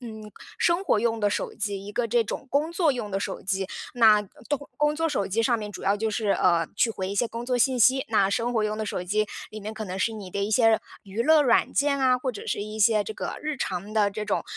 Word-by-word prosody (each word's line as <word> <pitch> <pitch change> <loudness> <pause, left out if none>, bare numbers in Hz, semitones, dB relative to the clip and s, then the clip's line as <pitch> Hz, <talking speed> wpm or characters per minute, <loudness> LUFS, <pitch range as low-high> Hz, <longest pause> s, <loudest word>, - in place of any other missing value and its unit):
嗯， 220 -3 -9 0.3
生 340 +2 +2
活 215 - +3
用 230 0 0
的 205 - +3
手 - - -2
机， 200 -2 -3
一 205 - -7
个 240 +1 0
这 235 +1 +2
种 225 - -6
工 295 +4 +1
作 335 -4 +2
用 225 -5 -5
的 195 - -1
手 195 -1 -4
机。 190 0 -1 0.3
那， 220 -3 +6 0.3
东 285 -1 -2
工 295 0 +2
作 325 +1 0
手 200 -10 -1
机 220 +4 0
上 235 0 +2
面 210 -1 -6
主 185 - -8
要 200 +1 +2
就 220 +1 -1
是， 215 -1 -2
呃， 170 -4 +3
去 230 - +3
回 190 -3 -4
一 - - -3
些 240 - +1
工 230 +1 -6
作 250 0 0
信 260 0 +2
息， 265 +3 +5
那 200 -3 +3
生 235 +3 0
活 220 -2 +1
用 215 0 -2
的 215 - -3
手 180 - -3
机， 210 +4 0 0.2
里 215 - -8
面 215 +2 -6
可 215 0 -5
能 185 0 -5
是 225 - +1
你 200 -4 -8
的 200 - -3
一 205 - -2
些 225 -1 +4 0.2
娱 205 +4 -3
乐 315 +1 +5
软 240 -4 +3
件 280 0 +1
啊， 255 -1 +3
或 255 0 -2
者 215 - -9
是 205 - -2
一 215 +1 -7
些 215 -1 +4
这 220 - -6
个 - - -5
日 305 -2 -2
常 195 -2 -4
的 210 -2 +2
这 210 +1 -4
种， 205 - -1
220 Hz, 290 characters per minute, -26 LUFS, 205-250 Hz, 0.3 s, 那